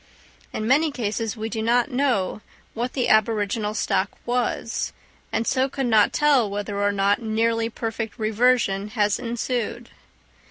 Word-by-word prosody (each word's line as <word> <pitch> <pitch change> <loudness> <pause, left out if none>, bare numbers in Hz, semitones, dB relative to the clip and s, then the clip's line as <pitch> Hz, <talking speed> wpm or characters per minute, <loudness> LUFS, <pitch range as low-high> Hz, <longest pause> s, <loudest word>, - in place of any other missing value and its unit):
In 215 - -3
many 300 +6 +4
cases 225 -4 -3
we 220 +1 -3
do 225 0 -3
not 240 +4 +2
know 245 -7 0 0.3
what 240 +2 -3
the 255 - 0
aboriginal 215 -1 +1
stock 200 -2 0 0.2
was, 245 -2 -1 0.4
and 225 - 0
so 260 +2 +1
could 270 0 -2
not 220 -3 +4
tell 285 -7 +3
whether 205 0 -3
or 205 0 +2
not 200 +1 +1
nearly 225 +1 0
perfect 225 -1 -4
reversion 220 -2 +2
had 210 -2 0
ensued. 240 0 -3
225 Hz, 145 wpm, -23 LUFS, 210-245 Hz, 0.4 s, many